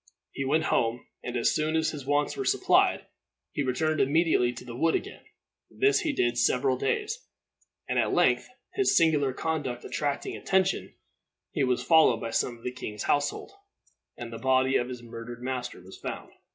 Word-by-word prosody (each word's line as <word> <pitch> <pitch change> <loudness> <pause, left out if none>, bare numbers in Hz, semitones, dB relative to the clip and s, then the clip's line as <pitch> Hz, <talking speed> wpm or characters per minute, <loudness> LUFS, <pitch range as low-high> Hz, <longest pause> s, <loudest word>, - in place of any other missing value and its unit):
He 135 - -4
went 155 +4 +2
home, 120 -5 0 0.2
and, 125 0 -3
as 115 - +2
soon 155 -1 0
as 160 0 +1
his 140 -4 -8
wants 145 +1 +1
were 400 - -3
supplied, 395 0 +3 0.5
he 145 - -2
returned 155 +4 0
immediately 145 -3 +3
to 125 0 -10
the 120 -2 -8
wood 165 +6 +2
again. - - -5 0.5
This 410 +1 +2
he 315 - 0
did 120 - 0
several 125 +2 +2
days; 420 - -1 0.7
and - - 0
at - - +1
length - - +2 0.2
his 395 -1 +2
singular 150 -5 +3
conduct 135 -4 -3
attracting 145 -1 -2
attention, 190 0 0 0.6
he 145 - 0
was 125 -1 +1
followed 160 -8 +5
by 115 - -5
some 120 +1 -1
of 115 - -20
the 125 - -2
king's 105 -4 -6
household, 145 - 0 0.7
and 115 -1 -7
the 115 - -6
body 130 +1 +2
of 120 - +1
his 125 -1 -7
murdered 120 +1 -8
master 125 -3 -4
was 90 +1 -13
found. - - -6
130 Hz, 180 wpm, -28 LUFS, 120-160 Hz, 0.7 s, followed